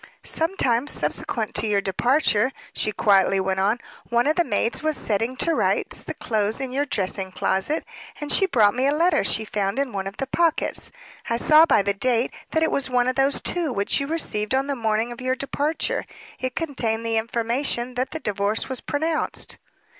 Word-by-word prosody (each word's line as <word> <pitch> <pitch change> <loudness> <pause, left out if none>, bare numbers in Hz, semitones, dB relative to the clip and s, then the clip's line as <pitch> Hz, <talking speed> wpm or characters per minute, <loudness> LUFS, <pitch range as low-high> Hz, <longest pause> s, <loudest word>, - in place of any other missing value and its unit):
"Some 330 +4 0
time 240 +2 +1
subsequent 225 -6 -2
to 220 - -1
your 205 -1 +2
departure," 235 - +2 0.2
she 215 - +1
quietly 195 -2 +3
went 190 0 0
on, 205 +5 +2 0.3
"one 240 0 +2
of 305 +2 +2
the 345 - +3
maids 230 -3 -1
was 310 -1 -1
setting 225 +4 -1
to 330 - +1
rights - - +1
the - - -7
clothes 215 0 -1
in 265 -2 -4
your 285 +3 -1
dressing 190 -4 -2
closet, 190 - -1 0.3
and 295 -1 -3
she 385 - +4
brought 215 - +4
me 255 +2 +1
a - - +3
letter 330 0 +3
she 220 +2 +1
found 200 0 -2
in 275 -3 -1
one 195 -1 -3
of 195 - -8
the 270 - -2
pockets. 330 +4 0 0.4
I 230 - +1
saw 310 +6 +6
by 200 - +4
the 200 +1 +1
date 240 +3 0 0.2
that 320 - +1
it 320 - +1
was 270 -1 0
one 250 -1 +2
of 255 - 0
those 275 +1 +2
two 340 -5 -1
which 200 +2 +1
you 280 - -2
received 260 -8 0
on 270 +1 +1
the 280 0 -2
morning 225 0 0
of 240 - -8
your 255 0 0
departure. 300 - -1 0.3
It 255 -1 -3
contained 235 -8 -2
the 225 0 0
information 235 +2 -1
that 255 +1 -1
the 320 - -5
divorce 205 -2 -1
was 260 -2 -3
pronounced." 315 +2 -1
245 Hz, 200 wpm, -23 LUFS, 210-285 Hz, 0.4 s, saw